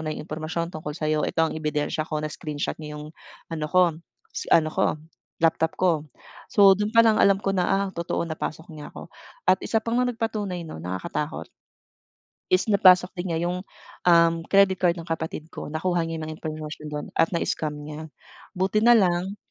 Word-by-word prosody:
na 155 Hz, -, -1 dB
'yong -, -, -7 dB
impormasyon 165 Hz, +2 st, -3 dB
tungkol 155 Hz, -1 st, -5 dB
sa'yo. 155 Hz, -1 st, 0 dB
Ito 165 Hz, 0 st, +1 dB
ang -, -, -6 dB
ebidensya 150 Hz, 0 st, -1 dB
ko." 155 Hz, -1 st, -2 dB
Na-screenshot 150 Hz, -1 st, -4 dB
niya 150 Hz, -1 st, -7 dB
'yong 150 Hz, +1 st, -8 dB, 0.4 s
ano 155 Hz, -2 st, -2 dB
ko 185 Hz, 0 st, +5 dB, 0.5 s
s -, -, -5 dB
ano 155 Hz, -1 st, +4 dB
ko, -, -, +1 dB, 0.5 s
laptop 160 Hz, 0 st, +2 dB
ko. 165 Hz, -5 st, +2 dB, 0.5 s
So, 200 Hz, -1 st, +7 dB
do'n 210 Hz, +1 st, -1 dB
pa 230 Hz, -, +8 dB
lang 220 Hz, -1 st, +4 dB
alam 195 Hz, 0 st, +4 dB
ko 195 Hz, -, 0 dB
na, 180 Hz, -, +1 dB
"Ah, 195 Hz, +1 st, +1 dB
totoong 170 Hz, 0 st, -3 dB
napasok 160 Hz, +1 st, -5 dB
niya 150 Hz, -1 st, -9 dB
ako." -, -, -10 dB, 0.4 s
At 185 Hz, -, +6 dB
isa 225 Hz, -, +1 dB
pa 230 Hz, -, -4 dB
ngang 245 Hz, 0 st, +2 dB
nagpatunay 210 Hz, -6 st, -3 dB
'no, 155 Hz, -, -8 dB
nakakatakot 95 Hz, -, -4 dB, 1.0 s
is 185 Hz, +4 st, +3 dB
napasok 185 Hz, -3 st, +6 dB
din 180 Hz, +1 st, -3 dB
nga 165 Hz, -, -1 dB
yung, 180 Hz, +2 st, -2 dB, 0.4 s
um, 170 Hz, -1 st, +6 dB
credit 195 Hz, -1 st, +5 dB
card 175 Hz, -1 st, +2 dB
ng 165 Hz, -, -11 dB
kapatid 160 Hz, -1 st, -4 dB
ko. -, -, -8 dB
Nakuha 170 Hz, +1 st, 0 dB
niya 165 Hz, -1 st, -4 dB
'yong 155 Hz, 0 st, -6 dB
impormasyon 155 Hz, -1 st, -6 dB
dun 150 Hz, 0 st, -4 dB
at 165 Hz, -, +3 dB
na-scam 160 Hz, -2 st, -1 dB
niya. 150 Hz, +1 st, -8 dB, 0.4 s
Buti 195 Hz, +4 st, +1 dB
nalang 195 Hz, -4 st, +4 dB
165 Hz, 180 wpm, -25 LUFS, 155-185 Hz, 1.0 s, pa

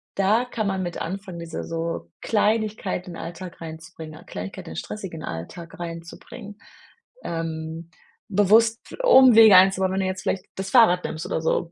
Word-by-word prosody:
da 210 Hz, +5 st, +2 dB
kann 235 Hz, -3 st, -3 dB
man 190 Hz, -1 st, -1 dB
mit 175 Hz, -1 st, -5 dB
anfangen, 185 Hz, 0 st, -6 dB
diese 170 Hz, -1 st, -6 dB
so 165 Hz, -, -4 dB
Kleinigkeiten 210 Hz, -4 st, -1 dB
in 170 Hz, -, -8 dB
Alltag 175 Hz, +1 st, -8 dB
reinzubringen, 160 Hz, -1 st, -10 dB
Kleinigkeit 90 Hz, +2 st, -7 dB
in -, -, -8 dB
den -, -, -9 dB
stressigen 180 Hz, -7 st, -6 dB
Alltag 165 Hz, -, -8 dB
reinzubringen, 170 Hz, +5 st, -9 dB, 0.7 s
ähm, 165 Hz, 0 st, -5 dB, 0.4 s
bewusst 215 Hz, +3 st, +4 dB, 0.2 s
Umwege 240 Hz, -, +8 dB
einzubauen, 190 Hz, 0 st, +4 dB
wenn 190 Hz, -, -1 dB
du -, -, -1 dB
jetzt 185 Hz, 0 st, -4 dB
vielleicht 190 Hz, -1 st, -2 dB
das 195 Hz, +1 st, -5 dB
Fahrrad 220 Hz, -8 st, +5 dB
nimmst 155 Hz, -, -5 dB
oder -, -, -2 dB
so. 165 Hz, +1 st, -1 dB
185 Hz, 155 wpm, -24 LUFS, 165-205 Hz, 0.7 s, Umwege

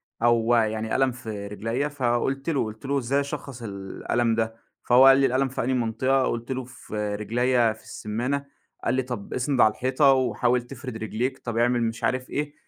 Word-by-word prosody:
أو 120 Hz, 0 st, +3 dB
يعني 110 Hz, -1 st, 0 dB
ألم 135 Hz, -1 st, +3 dB
في 110 Hz, -4 st, -6 dB
رجليّا 115 Hz, +7 st, -2 dB
فقُلت 135 Hz, +1 st, -1 dB
له، 145 Hz, -, +1 dB
قُلت 110 Hz, +2 st, -8 dB
له 140 Hz, +1 st, 0 dB
إزاي 135 Hz, +3 st, 0 dB
أشخّص 140 Hz, -3 st, -5 dB
الألم 110 Hz, +3 st, -1 dB
ده؟ 115 Hz, 0 st, -1 dB, 0.3 s
فهو 125 Hz, +2 st, +6 dB
قال 135 Hz, 0 st, +8 dB
لي 135 Hz, -, +4 dB
الألم 135 Hz, +1 st, +2 dB
في 130 Hz, -, -3 dB
أنهي 130 Hz, +2 st, 0 dB
منطقة؟ 130 Hz, +3 st, +1 dB
قُلت 120 Hz, +2 st, -3 dB
له 130 Hz, 0 st, -2 dB
في 105 Hz, -4 st, -5 dB
رجليّا 120 Hz, +2 st, +2 dB
في 110 Hz, -, -18 dB
السمّانة. 125 Hz, +7 st, -3 dB, 0.4 s
قال 120 Hz, -, +1 dB
لي 130 Hz, -, +2 dB
طَب 125 Hz, -5 st, -6 dB
اسند 130 Hz, 0 st, +1 dB
على 110 Hz, -, +6 dB
الحيطة 130 Hz, +3 st, +3 dB
وحاول 125 Hz, -1 st, +1 dB
تفرِد 125 Hz, -1 st, -8 dB
رجليك، 120 Hz, +4 st, -2 dB
طَب 115 Hz, -2 st, -4 dB
اعمل 120 Hz, 0 st, +2 dB
مش 115 Hz, 0 st, -3 dB
عارف 130 Hz, 0 st, 0 dB
إيه، 145 Hz, 0 st, -3 dB
120 Hz, 190 wpm, -25 LUFS, 115-130 Hz, 0.4 s, قال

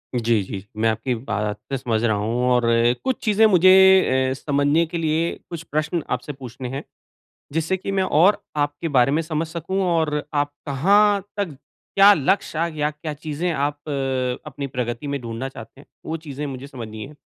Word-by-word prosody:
जी, 115 Hz, -2 st, +2 dB
जी। 95 Hz, +1 st, -7 dB
मैं 115 Hz, +1 st, +2 dB
आपकी 110 Hz, +4 st, -1 dB
बातें 105 Hz, +1 st, -4 dB
समझ 115 Hz, -3 st, -1 dB
रहा 110 Hz, -3 st, +2 dB
हूँ 115 Hz, +4 st, -1 dB
और 125 Hz, -1 st, +3 dB, 0.4 s
कुछ 260 Hz, -1 st, 0 dB
चीज़ें 215 Hz, 0 st, +4 dB
मुझे 185 Hz, -3 st, +5 dB
ए 190 Hz, -9 st, +5 dB
समझने 145 Hz, +3 st, +1 dB
के 170 Hz, +1 st, -5 dB
लिए 165 Hz, +1 st, 0 dB, 0.2 s
कुछ 170 Hz, -2 st, -6 dB
प्रश्न 155 Hz, +2 st, -1 dB
आपसे 125 Hz, +4 st, -3 dB
पूछने 125 Hz, -1 st, -8 dB
हैं, 135 Hz, +2 st, -5 dB, 0.7 s
जिससे 165 Hz, +4 st, 0 dB
कि 190 Hz, -, -5 dB
मैं 195 Hz, -1 st, +1 dB
और 185 Hz, +5 st, +3 dB, 0.2 s
आपके 145 Hz, +3 st, -1 dB
बारे 125 Hz, +2 st, +5 dB
में 155 Hz, +3 st, +2 dB
समझ 160 Hz, 0 st, -2 dB
सकूँ 170 Hz, +4 st, -3 dB
और 160 Hz, -4 st, +1 dB
आप 145 Hz, 0 st, 0 dB
कहाँ 200 Hz, +8 st, +3 dB, 0.2 s
तज 180 Hz, -8 st, -2 dB, 0.4 s
क्या 200 Hz, +1 st, +8 dB
लक्ष्य 165 Hz, 0 st, 0 dB, 0.2 s
या 150 Hz, 0 st, +1 dB
क्या 150 Hz, +1 st, -6 dB
चीज़ें 155 Hz, +3 st, -3 dB
आप 145 Hz, 0 st, -1 dB, 0.7 s
अपनी 140 Hz, -1 st, -5 dB
प्रगति 125 Hz, +1 st, -4 dB
में 140 Hz, 0 st, -2 dB
ढूँढना 115 Hz, +3 st, -5 dB
चाहते 130 Hz, +1 st, -12 dB
हैं, -, -, -20 dB, 0.2 s
वो 160 Hz, -, -3 dB
चीज़ें 150 Hz, -2 st, -6 dB
मुझे 135 Hz, -1 st, -6 dB
समझनी 110 Hz, -6 st, -8 dB
हैं। 150 Hz, +2 st, -13 dB
145 Hz, 175 wpm, -22 LUFS, 125-165 Hz, 0.7 s, क्या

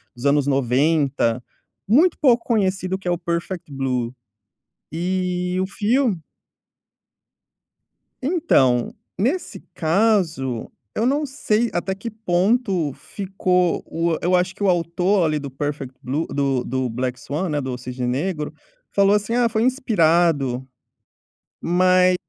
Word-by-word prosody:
dos 120 Hz, +2 st, -8 dB
anos 145 Hz, 0 st, +3 dB
90, 135 Hz, -2 st, +1 dB, 0.4 s
muito 310 Hz, -, +4 dB
pouco 245 Hz, -5 st, +4 dB
conhecido, 190 Hz, -4 st, 0 dB
que 190 Hz, -, -9 dB
é -, -, +2 dB
o 175 Hz, -, +1 dB
Perfect 170 Hz, -1 st, -4 dB
Blue. 130 Hz, -3 st, -2 dB, 0.8 s
E 180 Hz, +2 st, -1 dB
o 190 Hz, -, -1 dB
filme 215 Hz, 0 st, +1 dB, 2.0 s
Então, 195 Hz, -, +2 dB, 0.2 s
nesse 275 Hz, -, -1 dB
caso, 165 Hz, -, +1 dB, 0.2 s
eu 225 Hz, -, 0 dB
não 285 Hz, +4 st, +1 dB
sei 240 Hz, -5 st, 0 dB
até 190 Hz, +2 st, -1 dB
que 225 Hz, +4 st, -6 dB
ponto 195 Hz, -, +1 dB
ficou 185 Hz, -1 st, -1 dB
o 165 Hz, 0 st, -1 dB
eu 180 Hz, +2 st, +2 dB
acho 180 Hz, +1 st, +1 dB
que 200 Hz, -, -17 dB
o -, -, +3 dB
autor, 175 Hz, +2 st, +2 dB
ali, 155 Hz, -1 st, 0 dB
do 140 Hz, -1 st, -6 dB
Perfect 135 Hz, -1 st, -5 dB
Blue, 145 Hz, +6 st, -2 dB
do 135 Hz, -3 st, 0 dB
do 130 Hz, 0 st, -1 dB
Black 125 Hz, +2 st, -3 dB
Swan, 165 Hz, +6 st, -3 dB
né, 150 Hz, -1 st, -1 dB
do 130 Hz, -2 st, -4 dB
Cisne 125 Hz, 0 st, -5 dB
Negro, 150 Hz, +5 st, -2 dB, 0.4 s
falou 200 Hz, 0 st, +4 dB
assim: 210 Hz, +3 st, -1 dB
"Ah, 245 Hz, -1 st, +3 dB
foi 220 Hz, -1 st, 0 dB
inspirado". 165 Hz, -, +2 dB, 0.9 s
Mas 185 Hz, +1 st, +4 dB
175 Hz, 130 wpm, -22 LUFS, 140-200 Hz, 2.0 s, muito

